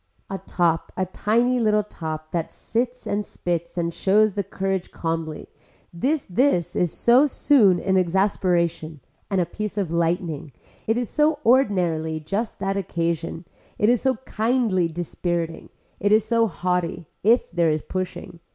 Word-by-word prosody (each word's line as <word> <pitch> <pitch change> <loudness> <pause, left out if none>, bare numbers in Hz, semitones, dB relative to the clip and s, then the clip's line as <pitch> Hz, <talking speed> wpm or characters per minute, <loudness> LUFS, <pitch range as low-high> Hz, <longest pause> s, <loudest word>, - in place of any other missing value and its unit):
A 195 - -3
top 170 -3 0
a 185 - +1
tiny 235 +7 +1
little 210 -2 +3
top 155 -5 -6
that 170 -2 -2
sits 245 +2 -3
and 205 +1 -1
spits 170 -3 -4
and 170 -1 -1
shows 210 +3 +3
the 200 - -1
courage 195 -2 -3
calmly, 165 -2 -4 0.5
this 275 - 0
this 185 - +1
is 175 -3 +1
so 250 +5 +4
soon 220 - +4
an 190 +1 +1
exasperation 175 -4 +1 0.3
and 195 -2 +1
a 175 - +2
piece 210 +4 -5
of 190 -5 -1
lightning, 165 -4 -1 0.3
it 225 +2 +2
is 245 -1 -1
so 300 +3 +2
ordinarily 175 -10 +2
just 200 +9 -3
that 195 0 -2
occasion, 170 -2 -2 0.3
it 210 - +3
is 245 -1 +3
so 265 -1 +2
kindly 220 -7 +1
dispiriting, 170 0 -3 0.3
it 205 - +1
is 215 0 +5
so 230 -1 +2
haughty 180 -1 -2 0.2
if 230 +5 +3
there 170 -2 +2
is 155 -1 0
pushing. 180 -2 -5
185 Hz, 150 wpm, -23 LUFS, 170-215 Hz, 0.5 s, is